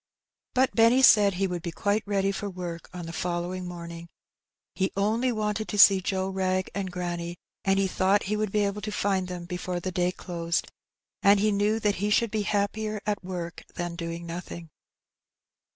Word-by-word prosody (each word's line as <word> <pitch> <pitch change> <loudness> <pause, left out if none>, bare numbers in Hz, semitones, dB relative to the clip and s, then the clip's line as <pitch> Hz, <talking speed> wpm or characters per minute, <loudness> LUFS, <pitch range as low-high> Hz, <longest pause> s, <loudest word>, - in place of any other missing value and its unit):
But 260 +1 +3
Benny 235 +3 +5
said 205 -5 +7
he 195 +2 +1
would 180 -2 -3
be 170 - -4
quite 205 +5 0
ready 195 -1 +1
for 200 +1 -4
work 175 -3 -6
on 180 -2 -7
the 165 - -7
following 180 +1 -3
morning; 170 -1 -8 0.7
he 190 0 0
only 225 +5 +2
wanted 215 -1 -1
to 210 - -3
see 195 -1 +8
Joe 190 0 -1
Wrag 185 -1 -1
and 195 -2 -3
granny, 175 -1 -4 0.3
and 195 -1 +2
he 195 - +3
thought 190 +2 +2
he 210 +2 -1
would 210 -1 -1
be 210 0 +2
able 200 +1 -2
to 210 - -4
find 195 -3 0
them 180 -1 -6
before 180 0 -3
the 185 +1 -4
day 180 -1 +1
closed, 170 -2 -3 0.5
and 200 0 +6
he 215 +1 +3
knew 210 +2 +1
that 205 -1 +1
he 205 +3 0
should 225 +1 +2
be 215 - 0
happier 210 +1 -1
at 210 -2 -1
work 175 -2 -5
than 175 -1 -3
doing 170 0 -5
nothing. 170 -1 -7
190 Hz, 190 wpm, -27 LUFS, 175-205 Hz, 0.7 s, see